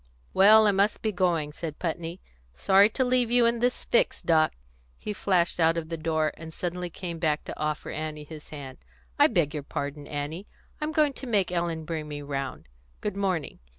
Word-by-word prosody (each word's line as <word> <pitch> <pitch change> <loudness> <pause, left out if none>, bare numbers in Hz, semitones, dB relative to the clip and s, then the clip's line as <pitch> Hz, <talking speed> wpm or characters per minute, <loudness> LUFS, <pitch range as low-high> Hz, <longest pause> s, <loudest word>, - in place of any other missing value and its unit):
"Well, 215 +3 +7
I 205 - +5
must 200 +2 +1
be 220 - +1
going," 175 -6 0
said 155 -1 -6
Putney. 170 +1 -4 0.3
"Sorry 195 - +5
to 260 +3 0
leave 250 -1 +2
you 240 0 +5
in 235 0 +2
this 245 +1 0
fix, - - +2
Doc." 160 -2 +3 0.4
He 210 - -5
flashed 180 -4 +1
out 165 0 +4
of 160 -1 -4
the 165 - -2
door, 155 -1 0
and 160 0 -9
suddenly 180 +1 -4
came 170 -1 -6
back 155 -2 0
to - - -8
offer 150 0 -2
Annie 155 -1 -5
his 150 0 -11
hand. 140 -3 -9 0.4
"I - - +8
beg 150 -4 +1
your 150 - -3
pardon, 145 +1 -5
Annie. 150 +6 -5 0.3
I'm 300 +1 -1
going 305 -3 +3
to 265 - -8
make 200 -6 +1
Ellen 170 -2 -2
bring 155 -2 -4
me 145 -1 -6
round. 135 - -4 0.3
Good 185 - -3
morning." 190 -6 -2
170 Hz, 195 wpm, -27 LUFS, 155-200 Hz, 0.4 s, I